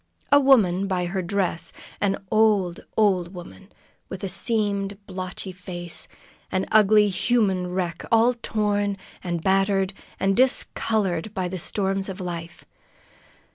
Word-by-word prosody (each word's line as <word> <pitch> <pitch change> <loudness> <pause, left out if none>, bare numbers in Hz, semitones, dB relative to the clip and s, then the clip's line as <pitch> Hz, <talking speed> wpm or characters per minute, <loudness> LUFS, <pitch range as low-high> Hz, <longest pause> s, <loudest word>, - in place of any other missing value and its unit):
A 285 - +8
woman 200 -9 +4
by 185 -2 -1
her 190 +2 -2
dress, 175 -3 -1 0.3
an 195 -1 +1
old, 210 -5 +3 0.2
old 190 -4 +2
woman, 180 +3 -11 0.4
with 190 - -7
a 195 - -2
seamed, 200 -1 0
blotched 185 0 -6
face; 175 -1 -6 0.4
an 185 0 0
ugly, 210 0 +6
human 195 -3 +1
wreck, 180 -2 -3
all 230 +2 +5
torn 205 -3 -1 0.3
and 175 -3 -3
battered 195 0 +2 0.3
and 195 0 +2
discolored 215 -7 +1
by 185 -1 -1
the 185 +1 -5
storms 195 +1 -1
of 190 +1 -6
life. 170 -2 -6
195 Hz, 130 wpm, -24 LUFS, 180-210 Hz, 0.4 s, A